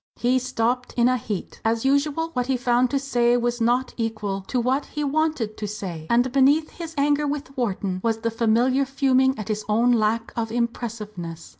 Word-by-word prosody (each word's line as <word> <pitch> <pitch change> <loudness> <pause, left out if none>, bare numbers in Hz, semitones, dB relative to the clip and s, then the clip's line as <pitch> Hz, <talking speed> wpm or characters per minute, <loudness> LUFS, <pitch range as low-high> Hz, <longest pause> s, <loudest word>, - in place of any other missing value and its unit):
He 250 +2 +2
stopped 250 0 -1
in 240 0 +4
a 255 - +3
heat. 215 -5 -5
As 225 +2 0
usual 290 +4 +1
what 250 -1 -1
he 265 -1 +1
found 245 0 +2
to 280 - 0
say 245 -3 +2
was 240 0 -1
not 245 +3 +1
equal 215 -4 -2
to 255 - 0
what 260 +4 0
he 300 - -4
wanted 290 -7 0
to 210 - -4
say, 180 -6 -6
and 245 +2 +3
beneath 280 +4 +3
his 330 -2 -8
anger 290 +1 +2
with 285 -1 -4
Wharton 195 -6 -2
was 225 -1 +1
the 230 +1 -2
familiar 235 +4 +2
fuming 265 -1 +2
at 215 - -6
his 215 0 -2
own 230 +4 +3
lack 225 0 +1
of 225 -1 -2
impressiveness. 215 -8 -4
240 Hz, 190 wpm, -24 LUFS, 225-270 Hz, -, in